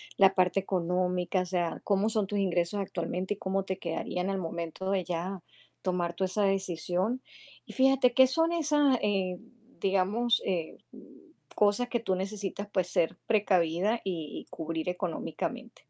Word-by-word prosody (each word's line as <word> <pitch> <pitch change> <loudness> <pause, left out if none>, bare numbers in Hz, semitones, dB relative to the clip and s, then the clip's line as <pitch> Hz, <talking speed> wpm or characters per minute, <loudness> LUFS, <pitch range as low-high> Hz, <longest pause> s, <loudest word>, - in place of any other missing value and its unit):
la 195 -1 +6
parte 185 +1 +2
económica, 180 0 0
o - - -2
sea, 175 -2 -1
cómo 200 +1 +2
son 215 -2 +1
tus 205 +1 -2
ingresos 180 +1 +1
actualmente 185 +1 -2
y - - -11
cómo 195 0 -1
te 190 -1 -3
quedarían 180 +2 -2
al 195 - -1
momento 170 +2 -4
de 190 -2 +1
ya 175 +2 -3 0.4
tomar 175 -2 -1
tú 190 - -2
esa 190 +3 0
decisión. 190 +4 0 0.4
Y - - -10
fíjate, 265 -2 +4
¿qué 260 - +7
son 325 +6 +1
esas, 295 -5 +3
eh, 190 -3 0 0.4
digamos, 200 +5 +2
eh, 170 -4 -2 0.2
mm, - - -11 0.5
cosas 210 +4 +2
que 240 - 0
tú 190 -5 0
necesitas, 200 +1 -4
pues 185 -2 +1
ser 165 - +1
precavida 200 0 +2
y 165 -6 -3
y - - -27
cubrir 165 0 -4
económicamente? 185 +7 -4
190 Hz, 160 wpm, -29 LUFS, 180-210 Hz, 0.5 s, qué